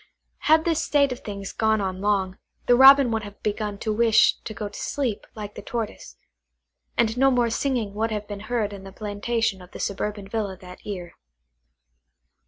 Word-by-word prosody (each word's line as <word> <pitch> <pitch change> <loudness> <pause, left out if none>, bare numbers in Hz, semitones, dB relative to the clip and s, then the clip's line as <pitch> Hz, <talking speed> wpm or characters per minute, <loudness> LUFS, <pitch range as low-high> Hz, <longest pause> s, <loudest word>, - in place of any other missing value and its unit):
Had 315 0 +6
this 330 -2 +1
state 280 -2 +3
of 250 - -4
things 200 -2 -6
gone 220 -1 +2
on 190 -1 -3
long, 195 -2 0 0.3
the 245 - +5
Robin 270 0 +8
would 225 -1 0
have 205 -1 -10
begun 210 -1 -2
to 215 +1 -2
wish 225 0 +5
to - - -8
go 210 -1 -4
to 205 - -9
sleep, 250 -8 -2
like 210 -1 -7
the - - -8
Tortoise; 235 -5 -5 0.8
and 225 -1 +2
no 270 +1 +6
more 245 -3 +2
singing 235 -5 -1
would 220 +2 -1
have 210 -1 -4
been 205 -1 -6
heard 220 -4 0
in 195 -1 -9
the 195 - -10
plantation 210 0 -2
of 180 - -13
the - - -8
suburban 205 0 -3
villa 200 -2 -3
that 180 -1 -13
year. 180 -4 -6
215 Hz, 190 wpm, -24 LUFS, 200-235 Hz, 0.8 s, Robin